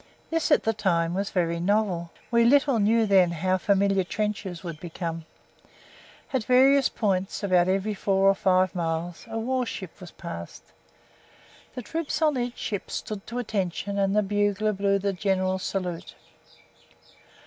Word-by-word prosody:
This 330 -1 0
at 295 - +4
the 225 - +1
time 175 -5 0
was 195 +2 -2
very 170 -2 0
novel 185 -2 0 0.2
we 235 0 +4
little 275 0 +4
knew 220 +2 +3
then 190 -4 +4
how 185 +3 0
familiar 195 0 +2
trenches 200 -2 -3
would 170 -4 -6
become. 165 -1 -5 1.1
At 260 -4 +1
various 270 +2 +5
points 195 -2 -1
about 180 -3 +3
every 195 +3 0
four 195 -1 +1
or 195 - +6
five 185 -1 +2
miles 170 0 -3
a 225 - -4
warship 230 -6 -3
was 180 - -9
passed. 85 - -8 1.1
The 250 - -5
troops 320 +5 -3
on 310 -3 +2
each 245 0 -3
ship 205 -3 -4
stood 210 -2 -5
to 235 - -5
attention 200 -3 -2
and 195 0 +1
the 210 - +3
bugler 205 +1 0
blew 200 0 +1
the 200 0 -1
general 190 -1 0
salute. 180 -2 -4
195 Hz, 150 wpm, -26 LUFS, 180-215 Hz, 1.1 s, or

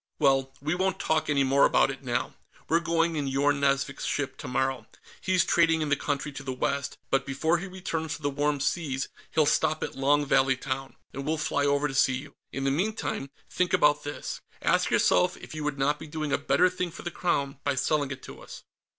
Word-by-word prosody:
Well, 135 -1 +3
we 150 +3 -1
won't 190 +1 0
talk 155 0 0
any 140 -1 +3
more 135 +1 +3
about - - +4
it, - - -9
now. - - -1 0.3
We're 165 - +3
going 165 0 +1
in 145 -2 -1
Yorn 140 +2 +2
Nazvik's 140 0 0
ship, 140 -2 -2
tomorrow; 130 -2 -2 0.3
he's 185 -2 +2
trading 165 -2 +3
in 150 - -2
the 145 - +4
country 145 +1 -2
to 145 - -8
the 135 -2 -4
west, 140 +2 -2
but 135 0 +3
before 160 +6 0
he 195 - -6
returns 170 -4 -4
to 150 - -13
the 145 - +1
Warm 145 +1 0
Seas, 140 -3 -1 0.2
he'll 155 -2 +3
stop 155 +1 +1
at - - -4
Long 145 +2 +2
Valley 135 -1 +3
Town, 135 0 -4 0.2
and 135 - -5
we'll 160 +3 -1
fly 145 -1 0
over 145 +1 +2
to 135 - -6
see 135 -1 +3
you. 140 +2 -8 0.2
In 135 - -4
the 135 - +2
meantime, 180 -4 -2 0.2
think 180 -1 -1
about 150 0 +4
this; 145 - -5 0.2
ask - - +2
yourself - - +3
if - - -11
you 155 -1 -5
would 150 -1 -2
not 145 +2 +1
be 160 - -8
doing 155 -1 -3
a - - +4
better 140 +4 +3
thing 180 -1 -2
for - - -10
the 175 - -4
Crown 140 -7 -1
by - - 0
selling 145 +1 +1
it 130 -1 -7
to - - -10
us." - - -11
145 Hz, 220 wpm, -27 LUFS, 135-160 Hz, 0.3 s, about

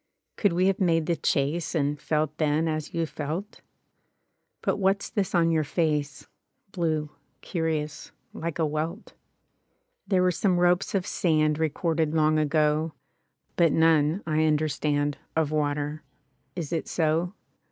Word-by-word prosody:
— - - -56
Could 205 -5 +2
we 180 +2 +2
have 195 0 +2
made 165 -4 +2
the 170 - +1
chase. 155 +4 0
And 145 -1 0
felt 155 -1 0
then 155 +1 +2
as 155 -1 -3
you 165 -1 -1
felt? 160 +7 -5 0.5
— - - -50
But - - +1
what's 195 0 +1
this 195 -2 -1
on 165 -1 +4
your 160 -1 +2
face, 150 -3 -1 0.5
Blue, 155 -4 -1 0.3
curious, 160 -3 -3 0.2
like 165 -1 -4
a 165 - +2
welt? 155 +7 -4 0.9
There 185 -3 +3
were 180 - +4
some 180 +1 +1
ropes 180 +3 +2
of 190 -2 0
sand 155 -3 +1
Recorded 160 0 0
long 155 0 +3
ago. 155 +1 +1 0.6
But 165 -3 +4
none, 160 +2 +3
I 155 0 +1
understand. 150 -1 0 0.2
Of 160 -2 +1
water. 150 0 -1 0.5
Is 170 -2 -4
it 165 - -2
so? 165 +3 0
160 Hz, 145 wpm, -26 LUFS, 150-170 Hz, 0.9 s, on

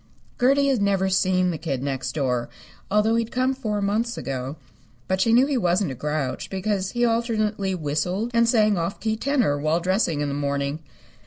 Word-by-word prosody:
Gertie 275 +3 +4
had 260 -6 +1
never 195 -1 +2
seen 185 -1 +2
the 160 - -5
Kid 140 -6 -3
Next 135 -2 -3
Door, 125 -5 -1 0.4
although 210 +2 +3
he 230 - +2
had 225 - -10
come 255 +1 +1
four 215 -6 -2
months 220 +4 0
ago. 135 +1 -4 0.5
But 190 0 0
she 225 - +3
knew 245 +3 +6
he 280 -2 0
wasn't 180 -3 +1
a - - -4
grouch, 150 0 -3
because 190 0 -2
he 240 0 +2
alternately 215 -4 0
whistled 180 +8 -2
and 230 0 +3
sang 215 -5 +3
off 170 +3 -3
key 220 -1 -1
tenor 235 - +1
while 155 +3 +1
dressing 180 -4 0
in 145 - 0
the 140 - -2
morning. 140 +1 -2
190 Hz, 190 wpm, -24 LUFS, 150-225 Hz, 0.5 s, knew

